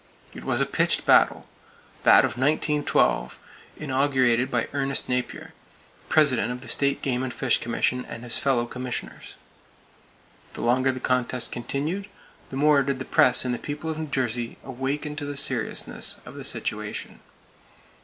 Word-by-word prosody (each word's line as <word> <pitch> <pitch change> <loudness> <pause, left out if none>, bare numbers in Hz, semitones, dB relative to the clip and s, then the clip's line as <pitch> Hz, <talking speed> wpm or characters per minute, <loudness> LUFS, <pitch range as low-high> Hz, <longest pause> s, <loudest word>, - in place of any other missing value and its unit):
It - - -10
was - - 0
a - - +3
pitched - - +1
battle,—that - - +2
of - - -2
1912, 145 - +1 0.4
inaugurated 130 -3 +1
by 120 -3 -1
Ernest 140 -1 -1
Napier, 125 0 -3 0.6
President 140 -6 +3
of 125 0 -6
the 125 - -10
State 140 +3 +1
Game 125 -2 0
and 130 -1 -3
Fish 125 -2 +1
Commission 125 +2 -1
and 115 - -9
his 120 - 0
fellow 130 -4 +1
commissioners. 125 0 -6 1.2
The - - -6
longer 130 +2 +2
the 130 - -6
contest 125 -1 0
continued, 155 +11 -3 0.4
the 135 - -6
more 145 0 +4
did 135 0 -1
the 130 - -6
press 125 0 +5
and 125 - 0
the 120 - -3
people 150 +2 -5
of 155 - -5
New 160 - -4
Jersey 120 -4 -2
awaken 135 +3 -4
to 145 - -4
the 145 -1 -5
seriousness 130 -4 0
of - - -10
the - - -8
situation. - - -2
130 Hz, 155 wpm, -25 LUFS, 125-145 Hz, 1.2 s, press